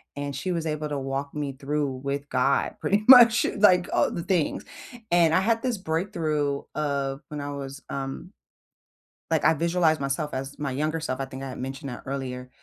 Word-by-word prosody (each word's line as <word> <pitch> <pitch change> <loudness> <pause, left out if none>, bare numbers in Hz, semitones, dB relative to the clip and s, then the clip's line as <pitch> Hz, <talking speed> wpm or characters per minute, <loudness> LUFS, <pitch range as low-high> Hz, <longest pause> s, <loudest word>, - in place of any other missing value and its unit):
and 145 0 -4
she 140 +8 -3
was 165 -1 -2
able 155 -1 -2
to 145 - -2
walk 135 +1 -4
me 145 -2 -2
through 145 +2 -2 0.2
with 140 +1 -3
God 130 +2 +1
pretty 205 +2 +1
much, 240 -3 +9
like, 185 -4 +5
all - - +2
the 170 - -4
things. 175 -4 0 0.5
And 170 -2 +4
I 185 - +4
had 225 +3 +1
this 250 -4 -1
breakthrough 160 -5 -1
of 140 -2 -2
when 150 -1 -6
I 145 0 -4
was, 140 -1 -7
um 135 +6 -5 1.0
like, 160 -2 +2
I 160 - +5
visualize 165 0 +2
myself 140 +2 -2
as 135 +1 -5
my 140 -2 -2
younger 155 +4 -1
self. 130 -4 -3
I 135 - -1
think 135 0 -8
I 135 - -5
had - - -7
mentioned 135 +2 -5
that 120 - -8
earlier. 130 -2 -5
145 Hz, 195 wpm, -26 LUFS, 135-165 Hz, 1.0 s, much